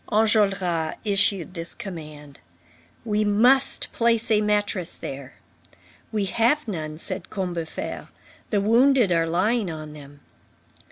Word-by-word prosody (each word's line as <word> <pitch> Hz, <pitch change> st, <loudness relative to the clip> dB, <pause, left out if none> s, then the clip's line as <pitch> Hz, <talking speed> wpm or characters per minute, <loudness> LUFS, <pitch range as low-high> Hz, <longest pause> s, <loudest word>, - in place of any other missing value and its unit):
Enjolras 195 Hz, -7 st, +2 dB
issued 200 Hz, -3 st, +1 dB
this 170 Hz, -1 st, -5 dB
command: 150 Hz, -6 st, -9 dB, 0.7 s
"We 215 Hz, -1 st, +1 dB
must 245 Hz, +6 st, +3 dB
place 230 Hz, -1 st, +1 dB
a 210 Hz, -1 st, +4 dB
mattress 205 Hz, -4 st, 0 dB
there." 135 Hz, 0 st, -8 dB, 0.8 s
"We 210 Hz, -3 st, 0 dB
have 235 Hz, +8 st, +1 dB
none," 155 Hz, -6 st, -4 dB
said 185 Hz, +2 st, -7 dB
Combeferre, 175 Hz, -5 st, -4 dB, 0.4 s
"the 205 Hz, -2 st, +1 dB
wounded 235 Hz, 0 st, +4 dB
are 165 Hz, -1 st, +2 dB
lying 195 Hz, +5 st, +1 dB
on 155 Hz, -2 st, -7 dB
them." 145 Hz, -1 st, -13 dB
195 Hz, 115 wpm, -24 LUFS, 165-215 Hz, 0.8 s, a